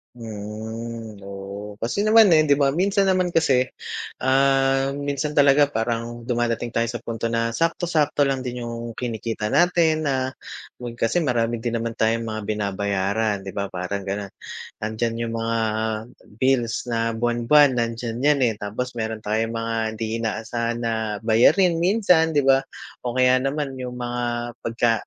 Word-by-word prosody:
Mm, 110 Hz, 0 st, -7 dB
oo 100 Hz, +1 st, -7 dB
kasi 115 Hz, -, -3 dB
naman, 215 Hz, -1 st, +6 dB
eh, 155 Hz, -1 st, +5 dB
'di 140 Hz, -, +5 dB
ba 140 Hz, -1 st, +2 dB
minsan 195 Hz, +6 st, +2 dB
naman 185 Hz, -2 st, +1 dB
kasi, 130 Hz, -6 st, +3 dB, 0.6 s
ah, 135 Hz, 0 st, +3 dB
minsan 145 Hz, +1 st, -2 dB
talaga 145 Hz, 0 st, +5 dB
parang 115 Hz, -1 st, -3 dB
dumadating 120 Hz, 0 st, -1 dB
tayo 115 Hz, 0 st, 0 dB
sa 115 Hz, 0 st, -5 dB
punto 115 Hz, 0 st, -3 dB
na 115 Hz, 0 st, 0 dB
sakto-sakto 160 Hz, 0 st, +1 dB
lang 135 Hz, -1 st, 0 dB
din 125 Hz, -1 st, -5 dB
yung 115 Hz, -1 st, -6 dB
kinikita 115 Hz, -3 st, -3 dB
natin 160 Hz, -1 st, +3 dB
na 130 Hz, -1 st, 0 dB, 0.5 s
nun 120 Hz, -1 st, -6 dB
kasi 120 Hz, +9 st, +1 dB
marami 120 Hz, -6 st, 0 dB
din 120 Hz, 0 st, -2 dB
naman 115 Hz, 0 st, -2 dB
tayong 115 Hz, +1 st, +2 dB
mga 110 Hz, -, -4 dB
binabayaran, 100 Hz, 0 st, -1 dB
di 95 Hz, -, -6 dB
ba, 100 Hz, +1 st, -3 dB
parang 95 Hz, +2 st, -4 dB
ganon. 100 Hz, 0 st, -3 dB, 0.5 s
Nandiyan 110 Hz, +2 st, -1 dB, 0.2 s
yung -, -, -5 dB
mga 115 Hz, 0 st, -1 dB, 0.8 s
bills 125 Hz, -2 st, +1 dB
na 115 Hz, 0 st, 0 dB
buwan-buwan 120 Hz, +4 st, +3 dB
nandiyan 115 Hz, 0 st, -2 dB
'yan, 145 Hz, +2 st, +3 dB
eh, -, -, -4 dB
tapos 120 Hz, +5 st, -4 dB
meron 110 Hz, -1 st, -3 dB
tayong 110 Hz, +2 st, -1 dB
mga 115 Hz, 0 st, -2 dB, 0.2 s
hindi 110 Hz, +1 st, -3 dB
inaasahan 115 Hz, +1 st, -2 dB
na 115 Hz, -1 st, 0 dB, 0.3 s
bayarin 165 Hz, -, +4 dB
minsan, 175 Hz, -3 st, +3 dB
di 145 Hz, -, +4 dB
ba? 135 Hz, 0 st, +3 dB, 0.4 s
O 120 Hz, -, -2 dB
kaya 130 Hz, 0 st, +4 dB
naman 135 Hz, 0 st, -2 dB
yung 125 Hz, -1 st, -5 dB
mga 120 Hz, 0 st, -3 dB, 0.4 s
pagka, 115 Hz, 0 st, +1 dB
120 Hz, 155 wpm, -23 LUFS, 115-135 Hz, 0.8 s, naman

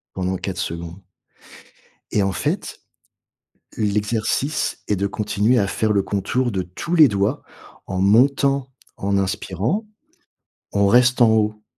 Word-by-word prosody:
pendant 95 Hz, 0 st, -1 dB
4 95 Hz, -1 st, -5 dB
secondes. 85 Hz, +1 st, -5 dB, 1.2 s
Et 105 Hz, -, +2 dB
en 95 Hz, 0 st, 0 dB
fait, -, -, -3 dB, 1.0 s
l'exercice 110 Hz, +7 st, -1 dB
est 105 Hz, -, +1 dB
de 100 Hz, +2 st, -1 dB
continuer 105 Hz, +4 st, +1 dB
à 100 Hz, -, +2 dB
faire 110 Hz, +2 st, 0 dB
le 100 Hz, -1 st, +2 dB
contour 120 Hz, +6 st, -1 dB
de 95 Hz, -2 st, -1 dB
tous 90 Hz, -, -5 dB
les 155 Hz, -4 st, +7 dB
doigts 100 Hz, +6 st, -1 dB, 0.4 s
en 95 Hz, -, -3 dB
montant, 135 Hz, +6 st, +3 dB, 0.3 s
en 100 Hz, 0 st, 0 dB
inspirant, 100 Hz, -, -2 dB, 0.9 s
on 100 Hz, 0 st, +2 dB
reste 125 Hz, +4 st, +4 dB
en 120 Hz, -, +7 dB
haut, 105 Hz, -1 st, 0 dB
105 Hz, 135 wpm, -21 LUFS, 95-125 Hz, 1.2 s, les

